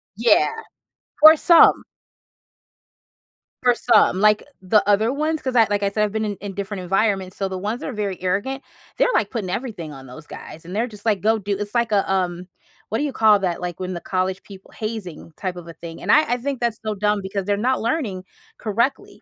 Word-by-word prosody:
Yeah, 240 - +4 0.7
for 310 +2 +10
some. 335 +1 +6 1.8
For 245 -1 +5
some. 220 -6 +3
Like 210 +1 +4 0.2
the 200 +2 +2
other 210 +3 +3
ones, 310 +2 -1
'cause 260 -1 -3
I 230 -2 +6
like, 205 0 0
I 200 - +2
said, 210 +1 0
I've 210 - 0
been 220 +1 -2
in 205 -1 -3
in 200 -1 -6
different 200 -1 -5
environments, 195 0 0
so 195 - -1
the 190 -1 -5
ones 210 +6 -3
that - - -4
are - - -5
very 200 -4 -4
arrogant, 200 +9 -2 0.4
they're - - +3
like 205 - +1
putting 215 -7 -4
everything 180 - -5
on 135 -1 -11
those 130 +5 -12
guys. 165 - -11
And 180 +3 -7
they're 230 +3 0
just 210 -3 -14
like, 210 -4 +1
go 220 +2 +2
do 200 -1 -2
it's 205 +1 -6
like, 235 -2 +1
uh, 200 -1 +3
um, 180 -2 -1 0.4
what 220 - -1
do - - 0
you 285 - -3
call 215 -3 +5
that? 180 -3 -2
Like, 175 -2 -5
when 185 0 -4
the 175 - -6
college 185 0 -2
people 195 -2 -14
hazing 215 -8 -6
type 185 -2 -4
of 175 -1 -10
a - - -9
thing. 165 0 -10
And - - 0
I 305 - +6
I - - 0
think 270 +1 -4
that's 235 -2 -1
so 215 - -1
dumb 210 +1 +1
because 195 0 -4
they're 205 +1 +1
not 255 +5 0
learning 230 - -2 0.3
correctly. 255 - -2
205 Hz, 220 wpm, -21 LUFS, 185-230 Hz, 1.8 s, for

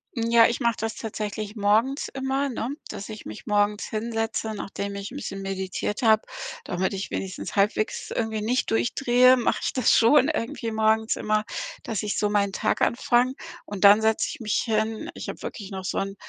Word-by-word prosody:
Hm, 230 -1 -1
ja, 230 -1 +7
ich 235 - -2
mache 235 -3 +1
das 225 0 -2
tatsächlich 215 -1 -5
morgens 220 +7 +2
immer, 270 +1 -1
ne, 235 -1 -3 0.2
dass 200 - -7
ich 215 0 -8
mich 105 - -9
morgens 205 0 +1
hinsetze, 225 0 -2
nachdem 200 0 -5
ich 200 +2 -6
'n - - -9
bisschen 195 -8 -5
meditiert 195 +1 -3
habe, 220 -2 +5 0.4
damit 185 +3 -1
ich 195 0 -4
wenigstens 190 -1 -5
halbwegs 210 +2 0
irgendwie 220 -2 -2
nicht 240 +4 0
durchdrehe, 245 - +4
mache 240 - +1
ich - - -1
das 255 -3 +3
schon 270 +5 +5
irgendwie 230 -5 -3
morgens 220 0 +2
immer, 215 0 0 0.4
dass 215 -4 -3
ich 210 - -2
so 210 - +1
meinen 200 -1 +1
Tag - - 0
anfange 245 +1 +2 0.3
und 205 -1 -5
dann 205 +2 +8
setze 220 0 +2
ich - - -7
mich 215 -4 0
hin. 220 -1 -1
Ich - - -7
habe - - -7
wirklich 205 -2 -7
noch 190 -1 -5
so - - -2
'n 195 0 -2
220 Hz, 190 wpm, -25 LUFS, 205-235 Hz, 0.4 s, dann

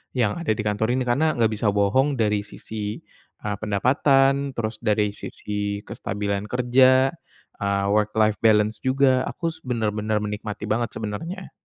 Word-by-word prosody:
yang 120 +2 +1
ada 150 -11 0
di 110 - -3
kantor 110 +3 0
ini 130 - 0
karena 140 +6 +1
nggak 115 -2 +2
bisa 110 0 -1
bohong 130 +8 +2
dari 105 -2 +2
sisi, 105 0 -6 0.4
eee, 105 -1 -2
pendapatan 135 +5 +2
terus 110 -1 -3
dari 105 -2 +1
sisi 105 -1 -4
kestabilan 100 +1 -3
kerja, 130 +2 +4 0.5
eee, 100 0 0
work-life 105 0 +2
balance 110 -1 +3
juga 130 -1 +3
aku 165 -1 -3
s 160 - -14
benar-benar 110 -3 -1
menikmati 105 0 -5
banget 115 +1 0
sebenarnya. 165 - -5
110 Hz, 145 wpm, -24 LUFS, 105-130 Hz, 0.5 s, kerja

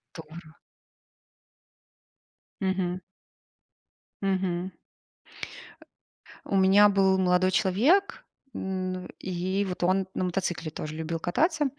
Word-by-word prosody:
Здорово! 160 0 -11 2.1
Мгм. 185 -1 -1 1.2
Мгм. 185 -1 -1 1.7
У - - -3
меня 195 +2 +6
был 195 -1 +3
молодой 185 0 +3
человек, 240 - +2 0.3
н 185 -1 -3
и 185 +2 -2
вот 180 -2 -4
он 185 +1 +2
на - - -2
мотоцикле 175 -3 -2
тоже 155 0 -6
любил 160 +1 -3
кататься. 300 - +1
185 Hz, 85 wpm, -27 LUFS, 175-195 Hz, 2.1 s, меня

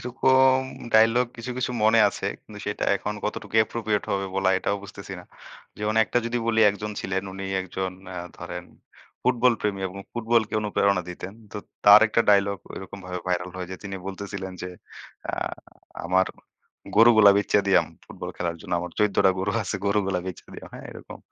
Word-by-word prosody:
এরকম 130 +1 +4 0.4
dialogue 115 +2 +5
কিছু, 120 +2 -6
কিছু 125 -1 -1
মনে 110 +1 +5
আছে - - -5 0.2
কিন্তু - - -11
সেটা - - -2
এখন 105 - -4
কতটুকু 105 - -4
appropriate 110 -2 -2
হবে 100 0 -1
বলা 95 -1 +3
এটাও 100 - -1
বুঝতেছি 100 -1 -9
না। - - -15 0.5
যেমন 105 +1 -1
একটা 120 - 0
যদি 120 +1 -1
বলি 115 -1 +2
একজন 105 +1 -5
ছিলেন 95 0 -2
উনি 95 +1 -6 0.2
একজন 95 0 -4 0.2
আ - - -7 0.2
ধরেন - - -6 0.6
ফুটবল 125 0 +3
প্রেমী 100 -2 -1
এবং 95 - -11 0.2
ফুটবলকে 115 -2 +1
অনুপ্রেরণা 100 -2 +1
দিতেন। 90 +2 -7 0.2
তো - - -6 0.3
তার 105 +1 +10
একটা 105 - +2
dialogue 100 -1 +3
ঐরকমভাবে 95 -1 -7
viral 90 0 -1
হয় 90 -1 -5
যে 95 - -5
তিনি 100 -1 -5
বলতেছিলেন, 95 -1 -6 0.8
‘’আ - - -2 0.7
আমার 95 +2 +3 0.7
গরু 115 +2 +8
গুলো 105 -2 +8
বেইচ্চা 100 0 +3
দিয়াম 100 - +4 0.2
ফুটবল - - -7
খেলার 85 -1 -2
জন্য। 90 +1 -8
আমার 90 - -5
১৪ 105 -1 +2
টা - - +6
গরু 95 +2 -1
আছে, 100 - -4
গরুগুলা 100 -2 +1
বেইচ্চা 95 - -7
দিয়াম।‘’ - - -10
হ্যাঁ - - -9
এরকম। - - -11
100 Hz, 170 wpm, -25 LUFS, 95-110 Hz, 0.8 s, তার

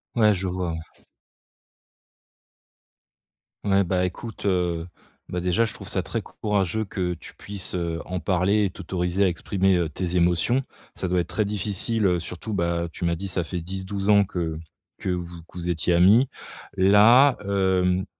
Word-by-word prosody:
Ouais, 105 -2 +5
je 95 0 -2
vois, 90 -1 -2
ouais. 80 - -4 2.9
Ouais, 100 0 +4
bah 90 0 +1
écoute, 110 +4 -6
heu, 90 -3 0 0.4
bah 90 0 -3
déjà, 90 +6 +2
je 110 - -4
trouve - - -8
ça - - +1
très - - -3
courageux 105 0 -1
que 90 -2 -2
tu 80 - -12
puisses, 100 -2 -5
heu, 85 -2 -2
en 90 0 -4
parler 100 +3 +2
et 100 - +1
t'autoriser 90 +1 -1
à - - +4
exprimer, 95 +2 +1
heu, 85 -2 0
tes 90 +3 -3
émotions. 90 +10 +2 0.3
Ça 95 - -3
doit 90 0 +2
être 85 - -1
très 110 - 0
difficile, 105 +2 -1
heu, 90 -3 +2
surtout, 90 +5 -6
bah 85 -2 0
tu - - -7
m'as 85 -1 +1
dit 100 +4 -5
ça 90 -2 -1
fait 90 +1 -4
10-12 95 +3 -4
ans 100 -1 +6
que 85 -4 -3 0.4
que - - -4
vous 85 -1 -4
que 85 - -15
vous 90 0 -3
étiez 85 +1 +1
amis. 105 +10 +5 0.5
Là, 110 +8 +6
hem, 95 -1 +1
90 Hz, 170 wpm, -24 LUFS, 85-100 Hz, 2.9 s, ans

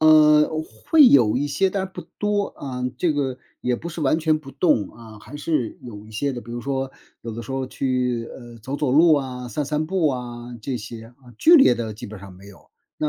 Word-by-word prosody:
嗯， 150 -1 +6 0.4
会 310 -4 +8
有 120 - +5
一 145 - -1
些， 185 +7 +1
但 190 -1 -1
是 190 - -18
不 - - -7 0.2
多。 205 -1 -1
嗯， 125 -2 -4
这 170 -4 +2
个 135 -3 -2 0.2
也 125 0 +1
不 170 - -7
是 170 0 -7
完 150 +3 +2
全 155 -1 +2
不 135 -3 -12
动， 135 - +1
嗯， 110 -2 -12
还 140 +7 -10
是 150 -5 -2
有 105 -3 -10
一 - - -14
些 135 +6 -2
的。 120 - -5
比 120 - -12
如 120 - -4
说， 135 0 -3 0.3
有 115 - -5
的 115 - -6
时 115 - -10
候 135 0 -2
去， 125 -3 -1
呃， 120 -2 -11
走 130 +6 -5
走 145 -4 0
路 160 +2 +6
啊、 125 -3 -3
散 145 +7 -2
散 150 +2 -1
步 180 -2 +1
啊， 120 -1 -6
这 130 +2 -3
些。 115 +1 -8
啊。 125 0 -18
剧 340 +2 +7
烈 270 - +6
的 110 -2 -4
基 105 - -10
本 105 -2 -10
上 100 - -11
没 95 +2 -15
有， 100 - -17 0.3
那 150 - 0
130 Hz, 250 characters per minute, -23 LUFS, 120-155 Hz, 0.4 s, 会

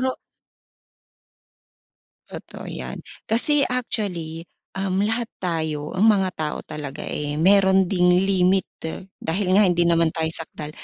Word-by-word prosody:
Siguro 260 0 +1 2.2
Totoo - - -9
yan. - - -6 0.3
Kasi 280 +5 +3
actually, 180 -10 -3 0.3
um, 190 0 0
lahat 225 +3 -1
tayo, 160 -4 -2
ang 200 - +4
mga 200 -4 +4
tao 155 -1 -2
talaga, 150 -3 -6
eh, 145 0 -2
meron 190 +1 +5
ding 180 -1 +3
limit. 190 -1 +2 0.6
Dahil 180 +4 -1
nga 210 - +6
hindi 175 -2 +2
naman 170 -1 +3
tayo 160 -1 -1
sakdal, 160 -2 -5
185 Hz, 120 wpm, -23 LUFS, 160-200 Hz, 2.2 s, nga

